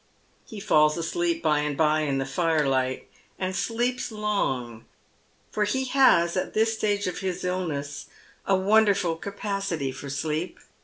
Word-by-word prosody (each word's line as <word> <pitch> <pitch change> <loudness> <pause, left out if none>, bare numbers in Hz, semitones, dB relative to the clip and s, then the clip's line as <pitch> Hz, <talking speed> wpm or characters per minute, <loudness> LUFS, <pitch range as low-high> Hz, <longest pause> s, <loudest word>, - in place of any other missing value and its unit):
He 220 - -8
falls 150 -4 +3
asleep 170 0 -1
by 150 -2 +3
and 150 -1 -2
bye 155 -1 +3
in 145 -3 0
the 135 - -1
firelight, 135 -5 0 0.3
and 185 0 -2
sleeps 240 +4 -1
long, 135 - -2 0.7
for 210 - 0
he 260 +6 0
has 250 -11 +4
at 185 - -2
this 225 +1 +3
stage 205 -2 0
of 180 - -3
his 185 -2 -3
illness 160 -6 -3 0.4
a 195 - +4
wonderful 195 -3 +3
capacity 195 -6 -3
for 130 +2 -8
sleep. 155 +5 -3
175 Hz, 145 wpm, -26 LUFS, 150-205 Hz, 0.7 s, has